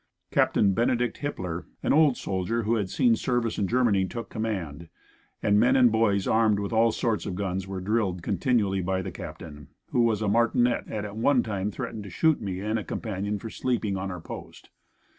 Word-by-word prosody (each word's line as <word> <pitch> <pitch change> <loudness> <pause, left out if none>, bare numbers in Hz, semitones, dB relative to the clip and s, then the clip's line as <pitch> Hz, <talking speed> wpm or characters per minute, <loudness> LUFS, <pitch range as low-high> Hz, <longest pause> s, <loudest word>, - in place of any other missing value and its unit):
Captain 100 -2 +3
Benedict 120 +3 0
Hippler, 90 - -4 0.2
an - - +2
old 150 -4 +4
soldier 100 +5 -2
who 110 +2 +1
had 105 -5 0
seen 120 +1 +3
service 120 -1 -1
in 100 - +1
Germany, 115 -4 +2
took 115 +5 -7
command, 85 -8 -4 0.5
and 105 0 +4
men 120 +3 +4
and 125 -3 +6
boys 105 -3 +2
armed 110 -2 +3
with 100 +2 -3
all 115 +1 +4
sorts 110 -2 -1
of 95 - -3
guns 95 -1 -3
were 95 -1 -4
drilled 95 -3 -1
continually 100 0 +1
by 95 +1 -1
the - - -5
Captain, 75 -3 -9 0.2
who 125 - +2
was 110 -2 +2
a - - 0
martinet 120 +3 +2
and 105 -1 -4
at 105 0 -7
one 125 +3 +3
time 100 -2 -2
threatened 105 +2 -5
to 100 - -9
shoot 160 - +2
me 95 -3 -4
and 110 +2 -1
a - - -5
companion 105 -1 -3
for 110 +2 -8
sleeping 115 -6 -1
on 95 0 -3
our 90 -2 -5
post. 85 - -10
105 Hz, 200 wpm, -26 LUFS, 95-115 Hz, 0.5 s, and